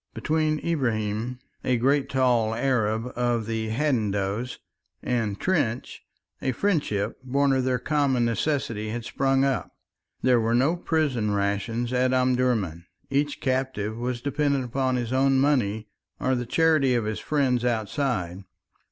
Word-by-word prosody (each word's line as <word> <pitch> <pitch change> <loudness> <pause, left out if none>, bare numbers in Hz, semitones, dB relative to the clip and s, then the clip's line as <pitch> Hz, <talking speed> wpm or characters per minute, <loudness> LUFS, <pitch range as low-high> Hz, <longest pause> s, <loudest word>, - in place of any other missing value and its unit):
Between 155 0 0
Ibrahim, 120 -6 -1 0.3
a 125 -1 +2
great 135 +3 +2
tall 120 -4 +2
Arab 115 -2 0
of 120 -2 0
the 110 0 -2
Hadendoas, 110 -3 -1 0.5
and 115 -5 -1
Trench, 130 -10 -1 0.4
a 130 - 0
friendship 145 - -1
born 140 +2 +2
of 130 -1 +1
their 130 -1 +1
common 135 -2 +1
necessities 115 -3 -1
had 120 -1 -4
sprung 135 +1 +1
up. 135 -4 -1 0.5
There 125 -2 +4
were 115 +1 +1
no 140 +8 +3
prison 140 -12 0
rations 110 +5 -1
at 130 +1 +2
Omdurman; 125 -10 +1 0.2
each 145 +1 0
captive 130 -5 -1
was 120 +1 -3
dependent 140 -1 0
upon 130 +1 0
his 120 0 -2
own 135 0 +3
money 115 -7 +1 0.3
or 130 - +1
the 120 -2 -2
charity 155 -3 +3
of 115 -3 0
his 110 0 -2
friends 130 -5 +1
outside. 110 -5 -1
125 Hz, 135 wpm, -25 LUFS, 110-135 Hz, 0.5 s, There